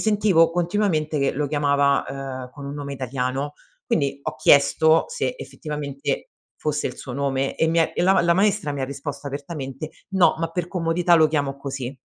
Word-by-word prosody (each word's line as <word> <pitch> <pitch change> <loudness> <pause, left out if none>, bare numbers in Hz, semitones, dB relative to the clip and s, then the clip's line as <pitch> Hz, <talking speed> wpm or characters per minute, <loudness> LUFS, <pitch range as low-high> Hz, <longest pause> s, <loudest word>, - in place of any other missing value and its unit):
sentivo 205 -6 +4
continuamente 170 -3 0
che 140 - +2
lo 145 +1 -1
chiamava, 140 -1 +2
uhm, 130 -2 -6
con 140 +2 -10
un 140 +1 -5
nome 140 -1 -5
italiano. 130 +2 -2 0.3
Quindi 140 - 0
ho - - -3
chiesto 155 +4 +5
se 485 +1 -2
effettivamente 145 -2 -4 0.3
fosse 150 -1 -1
il - - -9
suo 130 - -8
nome 135 0 -1
e 160 - +2
mi 165 +1 +2
è 165 - +2
e - - 0
la 190 +2 +5
ma 190 - +4
la 170 0 +3
maestra 195 -5 +1
mi 140 - -4
ha - - +1
risposto 140 +1 -6
apertamente: 140 0 -6 0.2
"No, 190 -2 +4
ma 165 0 -1
per 175 0 -2
comodità 175 -1 +2
lo 160 -2 +5
chiamo 140 -3 -1
così". 135 -1 -5
145 Hz, 190 wpm, -23 LUFS, 140-170 Hz, 0.3 s, chiesto